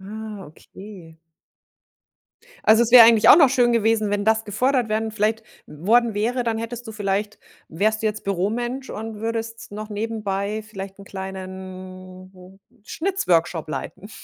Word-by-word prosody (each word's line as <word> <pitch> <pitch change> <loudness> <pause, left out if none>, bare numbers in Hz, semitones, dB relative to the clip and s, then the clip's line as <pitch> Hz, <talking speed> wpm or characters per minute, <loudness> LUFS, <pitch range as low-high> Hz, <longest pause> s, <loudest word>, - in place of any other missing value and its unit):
Ah, 210 -1 -8
okay. 180 0 -14 1.5
Also 220 +2 +6
es 235 - -1
wäre 235 -3 +11
eigentlich 230 -2 +5
auch - - +10
noch 285 -5 +7
schön 245 -2 +2
gewesen, 225 -2 +1
wenn 205 0 -1
das 220 0 +2
gefordert 245 +3 0
werden 220 +1 -1
vielleicht 220 +1 -1 0.2
w 150 +4 -12
worden 235 0 +3
wäre, 240 +4 -1
dann 225 -1 -1
hättest 235 +1 -6
du 220 - -7
vielleicht 205 0 -2 0.3
wärst 215 +6 0
du - - +1
jetzt 215 0 -3
Büromensch 235 +8 -2
und 220 -1 -7
würdest 225 -1 -5
noch 215 +1 -7
nebenbei 210 -1 -3
vielleicht 195 -1 -8
'n 200 - -12
kleinen 185 0 -10 0.2
Schnitzworkshop 175 - -1
leiten. 190 +6 -7
215 Hz, 150 wpm, -22 LUFS, 190-225 Hz, 1.5 s, wäre